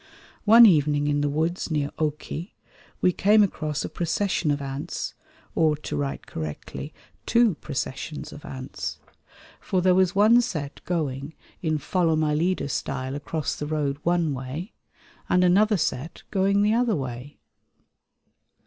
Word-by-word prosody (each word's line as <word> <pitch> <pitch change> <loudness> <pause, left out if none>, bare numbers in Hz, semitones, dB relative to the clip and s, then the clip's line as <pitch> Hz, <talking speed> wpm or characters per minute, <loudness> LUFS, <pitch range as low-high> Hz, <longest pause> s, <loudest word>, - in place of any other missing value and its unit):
One 230 +2 +9
evening 150 -6 +4
in 145 0 +1
the 145 - +1
woods 160 +6 -1
near 150 -3 -1
Occeh 155 +3 -3 0.5
we 180 - +4
came 210 +4 +4
across 155 -6 -2
a - - -2
procession 175 0 -1
of 145 0 +1
ants 140 0 -4 0.4
or, 155 -2 +3
to 150 - -6
write 70 -3 -3
correctly, 80 -2 -6 0.4
two 235 -3 +4
processions 145 +1 -5
of 145 - -11
ants; 130 0 -6 0.6
for 185 - -1
there 185 0 +4
was 185 +1 +3
one 220 +4 +6
set 155 -11 -5
going 150 -4 -2 0.3
in 155 -2 0
"follow 165 +2 +1
my 155 -1 +1
leader" 170 +2 0
style 135 -1 -3
across 150 +2 -3
the 150 - -5
road 145 -2 -1
one 170 -3 +1
way, 135 - -6 0.6
and 180 0 +4
another 205 +4 +4
set 155 -1 -3
going 200 +1 +2
the 210 +1 +3
other 235 -2 +2
way. 130 -1 -6
155 Hz, 145 wpm, -25 LUFS, 145-185 Hz, 0.6 s, One